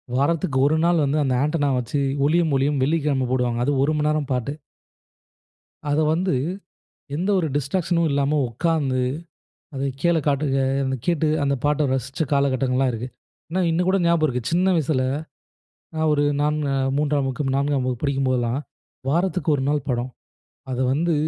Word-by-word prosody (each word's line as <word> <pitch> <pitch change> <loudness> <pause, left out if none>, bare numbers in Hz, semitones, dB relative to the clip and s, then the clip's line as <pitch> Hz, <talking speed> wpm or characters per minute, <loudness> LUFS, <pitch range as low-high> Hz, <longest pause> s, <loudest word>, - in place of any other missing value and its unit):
வாரத்துக்கு 140 0 +1
1 155 +2 +2
நாள் 170 -2 +3
வந்து 140 +2 0
அந்த 130 - 0
ஆன்டென்னா 145 -1 +1
வச்சு 125 +4 -2 0.3
ஒளியும் 165 0 +2
ஒலியும் 140 +1 +1
வெள்ளிக்கிழமை 145 -3 +1
போடுவாங்க 125 -2 0
அது 145 - +1
1 145 - +2
மணி 150 - +1
நேரம் 150 -2 -1
பாட்டு. 125 +2 -2 1.4
அத 145 +2 +2
வந்து 180 +2 0 0.8
எந்த 180 +6 -1
ஒரு 160 - 0
டிஸ்ட்ராக்ஷனும் 170 +4 0
இல்லாம 140 +2 +1
உட்கார்ந்து 135 0 0 0.7
அத 135 - -5 0.2
கீழே 170 -1 +3
காட்டு 145 +1 +1 0.2
அ - - +1 0.2
அதை 130 - -1
கேட்டு 165 -3 +1 0.2
அந்த 140 0 +1
பாட்டை 150 +1 +2
ரசிச்ச 135 +3 -3
காலகட்டங்கள்லாம் 130 -2 +1
இருக்கு. 120 +1 -5 0.4
ஆனா, 180 - -1
இன்னும் 175 +3 +1
கூட 195 - +3
ஞாபகம் 170 -2 +3
இருக்கு. 125 -3 -2
சின்ன 180 +3 +2
வயசுல, 150 -4 +1 0.9
நான் 160 0 +1
ஒரு 145 0 +2 0.2
நான்னு 150 -1 0 0.3
3ம் 145 -2 +1
வகுப்பு, 135 0 -2
4ம் 140 -1 +1
வகுப்பு 125 -2 -3
படிக்கும்போதெல்லாம், 130 -3 0 0.5
வாரத்துக்கு 180 +2 0
1 135 - -2
நாள் 150 0 +2
படம். 125 0 -1 0.6
அத 125 - -3
வந்து 165 +4 +1
145 Hz, 155 wpm, -23 LUFS, 130-160 Hz, 1.4 s, நாள்